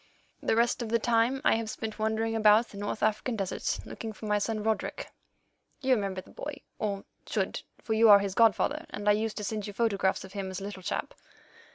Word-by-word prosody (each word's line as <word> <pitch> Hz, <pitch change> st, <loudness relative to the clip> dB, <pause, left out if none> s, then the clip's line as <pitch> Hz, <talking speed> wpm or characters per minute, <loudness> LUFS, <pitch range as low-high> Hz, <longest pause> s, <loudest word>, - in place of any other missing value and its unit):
The -, -, +1 dB
rest 235 Hz, +2 st, +2 dB
of 230 Hz, -, -3 dB
the 230 Hz, -, +3 dB
time 235 Hz, +3 st, +2 dB
I -, -, +6 dB
have 225 Hz, -1 st, -3 dB
spent 220 Hz, 0 st, -5 dB
wandering 220 Hz, +1 st, 0 dB
about 215 Hz, +1 st, +5 dB
the 200 Hz, -, -11 dB
North 205 Hz, +1 st, -3 dB
African 215 Hz, +3 st, +1 dB
deserts 195 Hz, -3 st, -2 dB
looking 225 Hz, -1 st, -6 dB
for 215 Hz, -, -10 dB
my 210 Hz, 0 st, +2 dB
son, 215 Hz, 0 st, -2 dB
Roderick. 220 Hz, 0 st, -2 dB, 0.7 s
You 265 Hz, -2 st, +3 dB
remember 195 Hz, -5 st, -1 dB
the -, -, -18 dB
boy, 285 Hz, -1 st, -7 dB, 0.2 s
or 200 Hz, -2 st, -2 dB, 0.2 s
should, -, -, -1 dB, 0.2 s
for 220 Hz, -, -1 dB
you 220 Hz, 0 st, +6 dB
are 205 Hz, -, +11 dB
his 200 Hz, -1 st, -2 dB
godfather, 235 Hz, -, +3 dB
and 205 Hz, -, -6 dB
I -, -, +7 dB
used 215 Hz, +1 st, 0 dB
to 210 Hz, -, -3 dB
send 210 Hz, 0 st, -3 dB
you 205 Hz, -, -6 dB
photographs 200 Hz, -4 st, +1 dB
of 190 Hz, -, -11 dB
him 195 Hz, -2 st, -4 dB
as 190 Hz, -, -5 dB
a -, -, -7 dB
little 200 Hz, -1 st, -6 dB
chap." -, -, -3 dB
215 Hz, 220 wpm, -29 LUFS, 205-230 Hz, 0.7 s, are